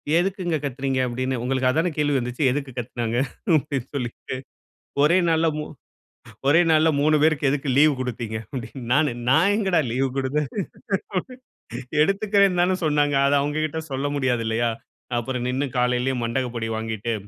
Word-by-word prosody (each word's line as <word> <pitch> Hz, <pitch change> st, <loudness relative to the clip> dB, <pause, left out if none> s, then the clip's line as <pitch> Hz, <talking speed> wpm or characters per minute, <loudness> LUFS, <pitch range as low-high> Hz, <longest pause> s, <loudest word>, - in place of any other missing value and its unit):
எதுக்குங்க 180 Hz, -1 st, 0 dB
கத்துறீங்க? 135 Hz, -1 st, -2 dB
அப்டின்னு 130 Hz, +1 st, -2 dB
உங்களுக்கு 130 Hz, 0 st, +1 dB
அதானே 165 Hz, +5 st, +1 dB
கேள்வி 145 Hz, -1 st, +1 dB
வந்துச்சு. 125 Hz, +4 st, -3 dB
எதுக்கு 140 Hz, 0 st, -3 dB
கத்துனாங்க 120 Hz, -1 st, -3 dB, 0.4 s
அப்டின்னு 135 Hz, -3 st, -3 dB
சொல்லிட்டு 125 Hz, 0 st, -4 dB, 0.7 s
ஒரே 165 Hz, +5 st, +5 dB
நாள்ல 165 Hz, 0 st, +3 dB
மூ 150 Hz, -, -2 dB, 0.8 s
ஒரே 160 Hz, +5 st, +6 dB
நாள்ல 160 Hz, 0 st, +5 dB
3 155 Hz, +1 st, +4 dB
பேருக்கு 155 Hz, -3 st, +3 dB
எதுக்கு 140 Hz, 0 st, -2 dB
லீவ் 150 Hz, 0 st, +6 dB
குடுத்தீங்க? 120 Hz, -3 st, -4 dB, 0.2 s
அப்டின்னு 125 Hz, +1 st, -6 dB
நானு, 150 Hz, -2 st, +3 dB, 0.2 s
நான் 165 Hz, +9 st, +4 dB
எங்க 210 Hz, -3 st, 0 dB
டா 160 Hz, -, +5 dB
லீவ் 135 Hz, +2 st, +1 dB
குடுத்தேன்? 135 Hz, +3 st, 0 dB, 1.6 s
எடுத்துக்குரேன்னு 195 Hz, 0 st, +3 dB
தானே 185 Hz, +1 st, +2 dB
சொன்னாங்க. 145 Hz, -1 st, +2 dB
அத 140 Hz, -, +3 dB
அவங்க 145 Hz, +1 st, -2 dB
கிட்ட 155 Hz, +1 st, -3 dB
சொல்ல 135 Hz, +2 st, -1 dB
முடியாது 130 Hz, -4 st, 0 dB
இல்லயா? 115 Hz, +1 st, +1 dB, 0.5 s
அப்புறம் 125 Hz, +1 st, -2 dB
நின்னு 130 Hz, +3 st, 0 dB
காலையிலேயே 125 Hz, +1 st, +1 dB
மண்டக 125 Hz, +2 st, -1 dB
பொடி 115 Hz, -1 st, -2 dB
வாங்கிட்டு 110 Hz, +1 st, -3 dB
135 Hz, 150 wpm, -23 LUFS, 125-155 Hz, 1.6 s, ஒரே